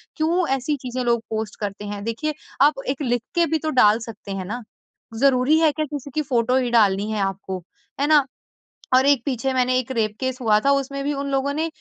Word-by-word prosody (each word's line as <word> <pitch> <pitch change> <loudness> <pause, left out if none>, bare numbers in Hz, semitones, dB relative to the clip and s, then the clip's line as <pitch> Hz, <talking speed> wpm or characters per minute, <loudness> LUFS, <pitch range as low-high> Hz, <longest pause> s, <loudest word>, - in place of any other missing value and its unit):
क्यों 340 +3 +1
ऐसी 270 +3 -1
चीज़ें 255 0 -3
लोग 235 -1 +1
पोस्ट 220 -1 -3
करते 205 0 -5
हैं? 205 0 -5
देखिए 230 +8 -2 0.3
आप 285 -1 +4
एक 270 +2 -2
लिख 245 -3 0
के 340 -1 +4
भी 320 -1 0
तो 315 - -2
डाल 220 -6 +5
सकते 225 -3 -9
हैं 195 -1 -4
ना। 235 +6 -5 0.6
ज़रूरी 270 +3 +4
है 320 -2 +4
क्या 310 +1 -2
किसी 285 -1 -7
की 310 - +2
फोटो 250 -3 +1
ही 255 -2 0
डालनी 210 -2 +3
है 215 - -2
आपको? 195 -1 -3 0.4
है 285 - +2
ना 300 -3 +5 0.7
और 260 +1 +5
एक 280 -4 +4
पीछे 265 -1 -1
मैंने 255 0 +2
एक 255 +1 -3
रेप 215 -3 -1
केस 260 0 -2
हुआ 215 -3 +4
था 275 - +2
उसमें 275 0 -1
भी 290 - 0
उन 280 0 -3
लोगों 275 +1 0
ने 315 +2 0
255 Hz, 225 wpm, -22 LUFS, 220-285 Hz, 0.7 s, डाल